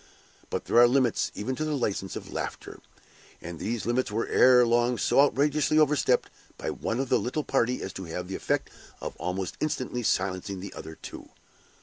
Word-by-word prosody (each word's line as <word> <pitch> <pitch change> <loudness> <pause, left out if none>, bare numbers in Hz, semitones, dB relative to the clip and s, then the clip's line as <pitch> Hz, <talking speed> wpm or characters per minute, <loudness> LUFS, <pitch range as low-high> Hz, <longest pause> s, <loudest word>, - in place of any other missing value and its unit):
But - - -3
there 120 - +4
are 120 - +8
limits 125 -2 +2
even 130 +6 -3
to 155 - -1
the 155 -2 -1
license 100 -6 -2
of - - -8
laughter; - - -5 0.6
and 85 -1 -8
these 115 0 -3
limits 120 +2 0
were 110 +2 -1
ere 125 -1 +6
long 120 +1 +2
so - - +2
outrageously 145 +1 +2
overstepped 150 -2 +3 0.3
by - - -3
one 115 +2 -3
of 135 -1 -2
the - - +3
little 150 +5 -2
party 125 -3 0
as 95 - -5
to 95 - -6
have 90 +2 -5
the 95 - -6
effect - - -1 0.3
of - - -6
almost 90 0 -3
instantly 130 -5 -2
silencing 95 -2 -1
the 95 +1 -8
other 80 - -8
two. - - -9
120 Hz, 190 wpm, -27 LUFS, 95-135 Hz, 0.6 s, are